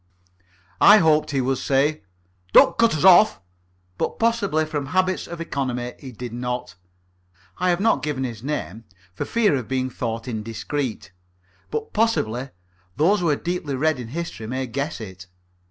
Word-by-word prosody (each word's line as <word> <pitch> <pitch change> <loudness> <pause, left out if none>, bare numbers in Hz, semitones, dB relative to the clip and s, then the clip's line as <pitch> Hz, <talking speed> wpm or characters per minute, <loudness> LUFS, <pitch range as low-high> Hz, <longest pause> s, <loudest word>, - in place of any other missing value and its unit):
I 210 +2 +9
hoped 155 -5 +3
he 135 -2 0
would 130 0 0
say, 140 0 +1 0.5
"Don't 170 - +7
cut 230 -4 +3
us 145 - -3
off," 175 - +7 0.6
but, - - -2
possibly 205 -9 +1
from 145 -3 -4
habits 185 +4 0
of 170 0 -7
economy, 125 -6 -3
he 130 - -9
did 120 0 -8
not. 125 -4 -4 0.9
I 180 - +2
have 175 0 +2
not 225 +3 +2
given 145 -3 -2
his 115 -4 -5
name, 115 - -4 0.3
for - - -4
fear 220 -8 +2
of 125 -4 -3
being 130 -1 -1
thought 115 -1 -4
indiscreet, 115 0 -4 0.6
but 150 +5 -4
possibly 135 - 0 0.5
those 180 +8 +3
who 175 -2 +1
are 145 - +3
deeply 175 -3 -3
read 155 0 +1
in 120 - -6
history 145 -5 -6
may 130 +3 -2
guess 140 +5 -4
it. 95 -4 -9
140 Hz, 160 wpm, -23 LUFS, 125-170 Hz, 0.9 s, I